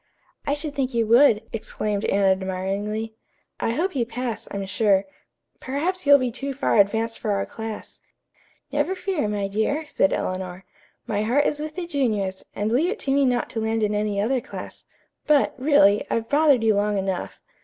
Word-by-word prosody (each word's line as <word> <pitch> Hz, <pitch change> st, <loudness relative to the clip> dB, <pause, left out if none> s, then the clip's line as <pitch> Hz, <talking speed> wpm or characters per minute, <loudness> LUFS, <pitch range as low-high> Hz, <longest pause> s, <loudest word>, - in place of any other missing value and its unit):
"I 285 Hz, -, +2 dB
should 295 Hz, 0 st, -5 dB
think 265 Hz, -3 st, -2 dB
you 230 Hz, -1 st, +2 dB
would," 230 Hz, -1 st, +5 dB
exclaimed 210 Hz, -2 st, -3 dB
Anne 200 Hz, 0 st, +2 dB
admiringly. 195 Hz, +3 st, -1 dB, 0.5 s
"I 230 Hz, -, 0 dB
hope 345 Hz, +6 st, -1 dB
you 250 Hz, -, +2 dB
pass, 230 Hz, -1 st, -4 dB
I'm 200 Hz, -1 st, -4 dB
sure. 195 Hz, 0 st, +2 dB, 0.5 s
Perhaps 315 Hz, +6 st, -2 dB
you'll 285 Hz, 0 st, +9 dB
be 255 Hz, -3 st, -1 dB
too 275 Hz, +3 st, -4 dB
far 270 Hz, -5 st, +2 dB
advanced 225 Hz, +3 st, +2 dB
for 210 Hz, -, -1 dB
our 195 Hz, 0 st, -1 dB
class." 220 Hz, -1 st, -8 dB, 0.7 s
"Never 290 Hz, +6 st, 0 dB
fear, 365 Hz, -, -1 dB
my 205 Hz, -1 st, -1 dB
dear," 220 Hz, +10 st, -1 dB
said 190 Hz, -9 st, +1 dB
Eleanor. 185 Hz, 0 st, -3 dB, 0.4 s
"My 205 Hz, -1 st, -1 dB
heart 250 Hz, +7 st, +2 dB
is 295 Hz, -, 0 dB
with 305 Hz, 0 st, -5 dB
the 360 Hz, -1 st, -3 dB
juniors, 215 Hz, -, -1 dB
and 210 Hz, +2 st, -1 dB
leave 295 Hz, +9 st, +2 dB
it 440 Hz, -, -2 dB
to 270 Hz, -, -1 dB
me 280 Hz, 0 st, +3 dB
not 245 Hz, -2 st, +1 dB
to 225 Hz, -, -3 dB
land 220 Hz, 0 st, 0 dB
in 210 Hz, 0 st, +1 dB
any 210 Hz, -1 st, -1 dB
other 245 Hz, +5 st, +1 dB
class. -, -, -9 dB, 0.4 s
But, 295 Hz, -2 st, +4 dB
really, 255 Hz, -8 st, +4 dB
I've 225 Hz, 0 st, -1 dB
bothered 285 Hz, -5 st, +4 dB
you 220 Hz, -1 st, +4 dB
long 205 Hz, 0 st, +1 dB
enough. 190 Hz, -1 st, -3 dB
225 Hz, 185 wpm, -24 LUFS, 205-280 Hz, 0.7 s, you'll